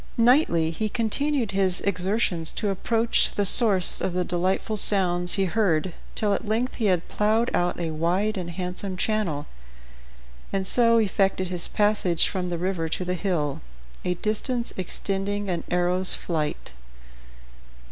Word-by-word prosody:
Nightly 230 - +3
he 215 +6 -3
continued 240 +2 -1
his 190 -1 +1
exertions 190 -3 0
to 205 -2 -1
approach 225 +4 +1
the 205 - 0
source 195 -3 +5
of 185 - -2
the 180 0 -1
delightful 185 +4 -1
sounds 180 -4 +2
he 195 -1 +1
heard, 185 -4 0 0.2
till 210 -2 +1
at 215 - -4
length 230 +4 -1
he 225 - -3
had 180 -3 0
plowed 220 +3 0
out 175 0 0
a 165 -2 -3
wide 180 +7 0
and 180 -3 -5
handsome 180 +2 -4
channel, 180 -9 -1 1.1
and 195 -1 -1
so 230 +3 +5
effected 195 -3 0
his 180 -2 -1
passage 205 -5 +1
from 180 -2 -3
the 175 - -3
river 175 -2 -2
to 180 - -3
the 180 - -1
hill, 170 -7 -2 0.4
a 180 0 -1
distance 235 +5 -1
extending 195 +2 -2
an 175 - -3
arrow's 180 +1 +2
flight. 155 - -4
190 Hz, 145 wpm, -24 LUFS, 175-215 Hz, 1.1 s, source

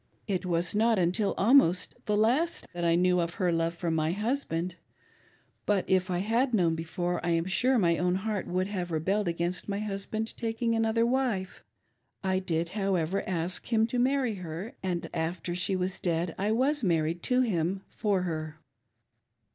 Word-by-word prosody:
It 185 -3 -1
was 170 +1 0
not 225 +1 +3
vintil 185 +3 +1
almost 200 -6 +4
the 210 -1 +2
last 260 +11 +1
that 175 0 -4
I 170 0 +3
knew 180 +1 +3
of 170 0 -2
her 180 -2 +1
love 165 0 0
for 170 -1 -2
my 160 0 +1
husbj(,nd; 205 -7 -1 0.9
bi^t 205 -3 +2
if 185 0 +1
I 180 - 0
had 230 +6 +1
known 170 -5 +3
before, 175 +2 -3
I 175 - 0
am 165 0 +1
sure 250 +8 +3
my 170 -6 +2
own 180 +1 +1
heart 205 +1 -2
would 185 +1 0
have 185 -3 -3
rebelled 185 +5 0
against 170 +3 -2
my 200 - -1
husband 215 +2 -3
taking 230 0 -1
ijdaother 225 0 +2
wife. 235 -8 -1 0.6
I 190 -1 +1
did, 170 -2 -1
however, 195 -2 0
ask 180 +4 -2
him 220 -1 +4
to 245 +2 -2
marry 260 -2 +2
her, 175 +6 -6
and 180 -3 -2
ffter 170 +1 -2
she 180 +2 0
was 185 +1 -2
dead 170 -1 -1
I 205 +3 0
was 265 +5 +2
married 165 -2 +1
to 250 0 +4
him 190 -4 0
for 200 -4 0
her." 155 -3 -4
185 Hz, 175 wpm, -29 LUFS, 170-220 Hz, 0.9 s, almost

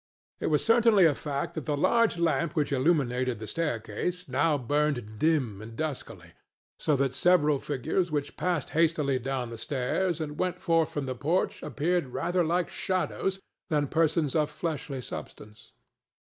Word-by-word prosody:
It - - -1
was 150 -2 +2
certainly 230 -4 +5
a 155 - +5
fact 140 0 -4
that 155 - -5
the 145 -1 0
large 230 +5 +3
lamp 165 -1 +1
which 150 -3 0
illuminated 130 -4 +1
the 110 - -7
staircase 150 - -3
now 145 +3 +2
burned 130 -5 -1
dim 135 -11 +1
and 115 +1 -9
duskily; 155 -4 -5 0.5
so 150 - +2
that 135 -1 0
several 150 -2 +3
figures 155 +7 -1
which 145 -2 -3
passed 175 -6 -1
hastily 155 -5 +2
down 130 -1 -3
the 115 - -7
stairs 150 +8 -1
and 150 -2 -5
went 180 -1 -1
forth 165 -3 +2
from 145 -2 -3
the 130 - -2
porch 155 +9 -1
appeared 170 0 0
rather 175 +8 0
like 175 +2 +1
shadows 190 +1 -2 0.3
than 150 -3 +2
persons 160 -3 +1
of 150 -2 +2
fleshly 150 -4 -4
substance. 105 -2 -9
150 Hz, 160 wpm, -28 LUFS, 135-170 Hz, 0.5 s, certainly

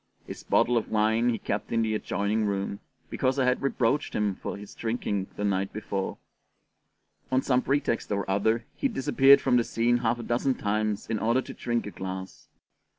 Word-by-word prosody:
His - - -8
bottle 120 0 +2
of 115 - -2
wine 110 +2 +2
he 115 - 0
kept - - -3
in 115 0 +2
the 110 -1 0
adjoining 105 +1 -1
room, 100 0 -2 0.3
because 130 +1 0
I 130 - +2
had 125 0 +2
reproached 140 +1 0
him 105 -2 +1
for 95 - -6
his 105 0 -10
drinking 110 -4 -2
the 105 - -4
night 95 -1 0
before: 100 -2 -3 1.1
on 130 0 +2
some 125 -1 +2
pretext 135 -6 -1
or 100 -1 -1
other 110 +4 +1
he 275 - 0
disappeared 135 - +5
from 125 -2 +3
the 120 - +3
scene 120 +1 +1
half 120 0 0
a 120 - -6
dozen 125 +3 0
times 105 0 -1
in 110 -1 -1
order 115 +4 +2
to - - -8
drink 120 -1 -2
a 105 - -6
glass. 95 0 -7
115 Hz, 190 wpm, -27 LUFS, 100-125 Hz, 1.1 s, disappeared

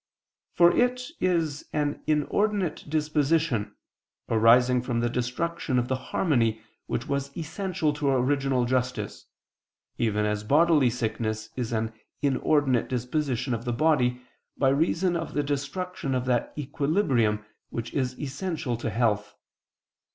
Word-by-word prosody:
For 175 0 +6
it 250 +1 +2 0.2
is 165 -5 0
an 150 -1 -1
inordinate 180 +3 0
disposition, 150 -5 +1 0.5
arising 120 +3 +5
from 120 -1 -1
the 120 0 0
destruction 130 +4 -1
of 125 0 0
the 130 - +1
harmony 115 - +1 0.3
which 115 - -3
was 140 0 -3
essential 165 -1 -1
to 145 -1 0
original 135 -1 +2
justice, 125 0 -2 0.7
even 105 -2 +1
as 105 0 -1
bodily 150 +2 +4
sickness 110 -2 -3
is 120 -3 -3
an 110 0 -1 0.3
inordinate 140 -2 +2
disposition 130 0 -1
of 115 0 -3
the 120 -1 -2
body, 125 -3 +2 0.3
by 135 - +3
reason 165 +5 +1
of 165 -1 -4
the 145 - +1
destruction 145 +1 -3
of 125 0 -1
that 125 -2 0
equilibrium 140 - +1 0.2
which 115 0 -5
is 130 -3 -1
essential 145 -2 -3
to 115 - -3
health. 105 -2 0
135 Hz, 130 wpm, -27 LUFS, 120-155 Hz, 0.7 s, For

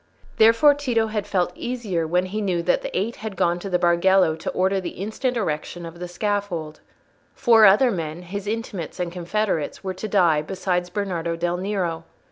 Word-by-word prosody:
Therefore 230 +7 +6
Tito 250 -6 0
had 210 -2 -2
felt 180 -3 0
easier 215 -10 -3
when 180 +3 +1
he 210 +4 -4
knew 180 -4 0
that 180 - +2
the - - -4
Eight 215 +5 -2
had 215 -2 -6
gone 175 0 +1
to 195 - -6
the 180 - +2
Bargello 175 0 +3
to 160 - -5
order 190 +1 +1
the 175 - -6
instant 230 +6 -2
erection 170 -2 -3
of 165 +1 -10
the 180 - -5
scaffold. 175 -4 -3 0.6
Four 225 -3 +6
other 225 +6 +5
men—his 180 +3 -5
intimates 210 -6 -4
and 175 -1 -2
confederates—were 185 0 -2
to 185 +4 -6
die, 175 -7 +3
besides 180 +1 -2
Bernardo 175 -4 -2
del 175 +1 -1
Nero. 180 -4 -2
185 Hz, 175 wpm, -23 LUFS, 170-210 Hz, 0.6 s, Therefore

